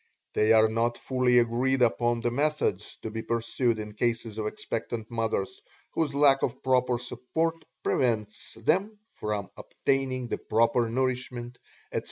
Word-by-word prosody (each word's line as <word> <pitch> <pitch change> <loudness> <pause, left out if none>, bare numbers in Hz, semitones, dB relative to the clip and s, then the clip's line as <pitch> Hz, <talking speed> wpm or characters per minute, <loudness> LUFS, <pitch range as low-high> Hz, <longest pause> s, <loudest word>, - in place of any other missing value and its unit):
They 110 +1 +3
are 110 0 +7
not 115 +2 0
fully 125 -1 +2
agreed 125 +2 +3
upon 120 0 +2
the 120 - 0
methods 140 -7 0
to 110 - -4
be 110 +1 -4
pursued 115 +1 0
in 105 0 -5
cases 115 0 -1
of 105 - -1
expectant 115 +1 -4
mothers 115 -4 -2 0.3
whose 150 -4 -1
lack 140 -1 +5
of 120 - -2
proper 125 -1 +2
support 160 +7 -2 0.2
prevents 110 -4 -1
them 190 - +1
from 105 -2 -4
obtaining 130 -2 -1
the - - -2
proper 115 +1 +2
nourishment, 125 -1 -2 0.3
etc. - - 0
120 Hz, 145 wpm, -28 LUFS, 115-130 Hz, 0.3 s, are